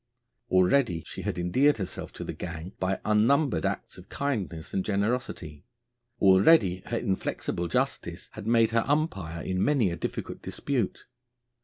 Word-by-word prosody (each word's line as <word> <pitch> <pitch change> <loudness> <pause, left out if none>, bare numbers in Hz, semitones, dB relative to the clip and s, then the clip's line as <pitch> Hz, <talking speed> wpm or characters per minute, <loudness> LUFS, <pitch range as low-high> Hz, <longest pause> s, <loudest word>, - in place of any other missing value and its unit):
Already 95 - +3
she - - -7
had - - -3
endeared 130 +12 +3
herself 95 -3 -5
to - - -6
the - - -5
gang 85 +1 -7
by 95 +1 0
unnumbered 110 - +3
acts - - -5
of 90 - -15
kindness 95 - -3
and 95 - 0
generosity; 100 - -2 0.6
already 95 - +5
her 115 - -1
inflexible 95 -4 -2
justice - - -2
had 100 - -8
made 115 -1 +4
her 115 0 +2
umpire 95 - -1
in 95 0 -1
many 130 -11 +2
a - - -2
difficult 80 - -5
dispute. 130 -8 -2
95 Hz, 145 wpm, -28 LUFS, 90-120 Hz, 0.6 s, already